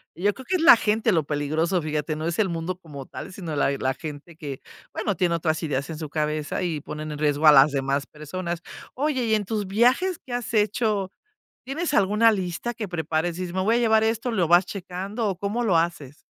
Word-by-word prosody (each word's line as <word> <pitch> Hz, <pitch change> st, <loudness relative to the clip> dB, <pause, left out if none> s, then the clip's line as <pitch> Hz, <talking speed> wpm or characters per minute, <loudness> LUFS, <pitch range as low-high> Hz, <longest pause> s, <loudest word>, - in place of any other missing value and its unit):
Yo 200 Hz, +5 st, +1 dB
creo 260 Hz, -, -11 dB
que 375 Hz, -, 0 dB
es 360 Hz, -, 0 dB
la 330 Hz, -5 st, +9 dB
gente 220 Hz, +1 st, +1 dB
lo 165 Hz, -5 st, +2 dB
peligroso, 155 Hz, +5 st, 0 dB
fíjate, 150 Hz, 0 st, -2 dB
no 155 Hz, +1 st, -4 dB
es 170 Hz, +3 st, -2 dB
el 205 Hz, -3 st, +2 dB
mundo 170 Hz, +2 st, -3 dB
como 145 Hz, -6 st, -9 dB
tal, 190 Hz, -, -8 dB
sino 170 Hz, -5 st, -5 dB
la 140 Hz, -, +2 dB
la 130 Hz, 0 st, 0 dB
gente 155 Hz, +3 st, -9 dB
que, 145 Hz, -4 st, -7 dB, 0.3 s
bueno, 205 Hz, -, -2 dB
tiene 175 Hz, 0 st, +1 dB
otras 160 Hz, -1 st, -1 dB
ideas 140 Hz, -2 st, -2 dB
en 160 Hz, -2 st, -6 dB
su 155 Hz, -2 st, -5 dB
cabeza 150 Hz, +2 st, -2 dB
y 165 Hz, -4 st, -2 dB
ponen 155 Hz, +1 st, -6 dB
en 150 Hz, -, -6 dB
riesgo 150 Hz, 0 st, +1 dB
a -, -, +11 dB
las 140 Hz, +1 st, +7 dB
demás 140 Hz, 0 st, -1 dB
personas, 170 Hz, +3 st, -5 dB, 0.3 s
oye, 265 Hz, -2 st, 0 dB
y 220 Hz, -1 st, +3 dB
en 210 Hz, -1 st, -1 dB
tus 210 Hz, -1 st, -2 dB
viajes, 250 Hz, -, +2 dB
¿qué 250 Hz, -, -7 dB
has 245 Hz, -1 st, -3 dB
hecho? 210 Hz, -2 st, +1 dB, 0.5 s
¿Tienes 295 Hz, +5 st, -2 dB
alguna 210 Hz, +1 st, +4 dB
lista 190 Hz, +3 st, -3 dB
que 220 Hz, -2 st, -5 dB
prepares? 165 Hz, -1 st, -1 dB
Dices: 180 Hz, -1 st, -4 dB
"Me 190 Hz, -, 0 dB
voy 220 Hz, +5 st, +2 dB
a -, -, +3 dB
llevar 220 Hz, -2 st, +4 dB
esto", 225 Hz, +2 st, 0 dB
¿lo 185 Hz, -7 st, +1 dB
vas 175 Hz, +2 st, +5 dB
checando? 195 Hz, +4 st, -4 dB
¿O 190 Hz, -, -3 dB
cómo 205 Hz, +5 st, -2 dB
lo 190 Hz, -7 st, +3 dB
haces? 165 Hz, -5 st, -2 dB
180 Hz, 225 wpm, -24 LUFS, 155-215 Hz, 0.5 s, a